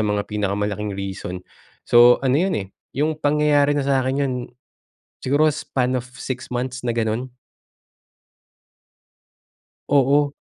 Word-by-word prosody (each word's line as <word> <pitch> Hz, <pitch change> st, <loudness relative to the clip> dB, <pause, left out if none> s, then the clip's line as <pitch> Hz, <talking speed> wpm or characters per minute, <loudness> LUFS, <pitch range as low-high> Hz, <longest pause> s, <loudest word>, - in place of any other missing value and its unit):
mga 105 Hz, -1 st, 0 dB
pinaka-malaking 105 Hz, 0 st, -2 dB
reason. 95 Hz, -2 st, -5 dB, 0.5 s
So, 120 Hz, +1 st, +7 dB
ano 135 Hz, +3 st, +3 dB
yun 190 Hz, 0 st, +1 dB
eh, 95 Hz, -2 st, -4 dB, 0.3 s
yung 155 Hz, +2 st, 0 dB
pangyayari 145 Hz, -1 st, +3 dB
na 140 Hz, -, 0 dB
sa 135 Hz, -1 st, +2 dB
akin 130 Hz, +1 st, -1 dB
yun, 130 Hz, -2 st, -1 dB, 0.8 s
siguro 145 Hz, +4 st, +2 dB
span 130 Hz, -4 st, -1 dB
of 125 Hz, -, -7 dB
6 130 Hz, -1 st, -6 dB
months 125 Hz, +1 st, -3 dB
na 120 Hz, -, 0 dB
ganon. 115 Hz, +3 st, -2 dB, 2.5 s
Oo. 140 Hz, +1 st, +3 dB
130 Hz, 120 wpm, -22 LUFS, 105-145 Hz, 2.5 s, So